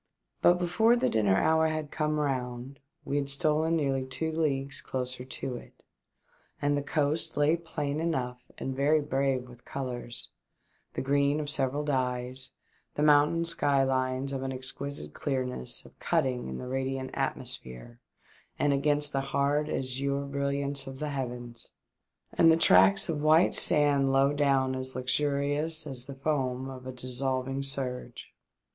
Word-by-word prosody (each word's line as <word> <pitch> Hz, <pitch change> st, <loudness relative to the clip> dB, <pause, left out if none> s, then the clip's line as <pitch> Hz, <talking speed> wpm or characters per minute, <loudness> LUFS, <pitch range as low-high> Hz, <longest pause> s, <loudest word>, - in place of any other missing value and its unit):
But 175 Hz, -, +6 dB
before 210 Hz, +7 st, +3 dB
the 245 Hz, -, +1 dB
dinner 105 Hz, -4 st, +3 dB
hour 160 Hz, +6 st, +3 dB
had 155 Hz, -2 st, -3 dB
come 150 Hz, -1 st, -1 dB
round 130 Hz, -2 st, -3 dB, 0.3 s
we 140 Hz, -, -1 dB
had 140 Hz, -1 st, -1 dB
stolen 155 Hz, +3 st, +2 dB
nearly 135 Hz, -4 st, 0 dB
two 130 Hz, +5 st, -2 dB
leagues 140 Hz, -4 st, -1 dB
closer 125 Hz, -1 st, -4 dB
to 130 Hz, -1 st, -5 dB
it, -, -, -15 dB, 0.8 s
and 145 Hz, 0 st, +1 dB
the 145 Hz, -, 0 dB
coast 145 Hz, +2 st, -1 dB
lay 150 Hz, +2 st, +4 dB
plain 155 Hz, -3 st, -4 dB
enough 125 Hz, -7 st, -2 dB, 0.2 s
and 135 Hz, -, -4 dB
very 145 Hz, +3 st, +3 dB
brave 135 Hz, -3 st, -1 dB
with 125 Hz, 0 st, -15 dB
colours, 125 Hz, -3 st, -5 dB, 0.7 s
the -, -, -2 dB
green 140 Hz, +2 st, +2 dB
of 150 Hz, -1 st, -2 dB
several 140 Hz, 0 st, 0 dB
dyes, 130 Hz, -2 st, -2 dB, 0.5 s
the 150 Hz, -, 0 dB
mountain 150 Hz, +3 st, +4 dB
sky 145 Hz, -5 st, +2 dB
lines 130 Hz, +1 st, -1 dB
of 135 Hz, -, -3 dB
an 135 Hz, 0 st, -3 dB
exquisite 130 Hz, -, -4 dB
clearness 130 Hz, -, -2 dB
of -, -, -18 dB
cutting 125 Hz, -, 0 dB
in 65 Hz, 0 st, -5 dB
the -, -, -6 dB
radiant 130 Hz, 0 st, -3 dB
atmosphere -, -, -4 dB, 0.6 s
and 145 Hz, -1 st, +2 dB
against 145 Hz, +1 st, +2 dB
the 135 Hz, -, +1 dB
hard 140 Hz, +2 st, 0 dB
azure 140 Hz, +2 st, -1 dB
brilliance 140 Hz, 0 st, -2 dB
of 135 Hz, 0 st, -7 dB
the 150 Hz, +2 st, -3 dB
heavens, 120 Hz, -3 st, -5 dB, 0.6 s
and 165 Hz, -1 st, +6 dB
the 160 Hz, -, +4 dB
tracts 95 Hz, -, +5 dB
of 155 Hz, -3 st, -2 dB
white 155 Hz, +3 st, +5 dB
sand 140 Hz, -2 st, +5 dB
low 135 Hz, +1 st, +3 dB
down 135 Hz, -2 st, +2 dB
as 130 Hz, 0 st, -5 dB
lustrous 145 Hz, +4 st, 0 dB
as 130 Hz, -4 st, -3 dB
the 140 Hz, -, -7 dB
foam 135 Hz, -2 st, -2 dB
of 130 Hz, -1 st, -9 dB
a -, -, -4 dB
dissolving 130 Hz, +1 st, -2 dB
surge. 135 Hz, -2 st, -4 dB
140 Hz, 150 wpm, -29 LUFS, 130-145 Hz, 0.8 s, But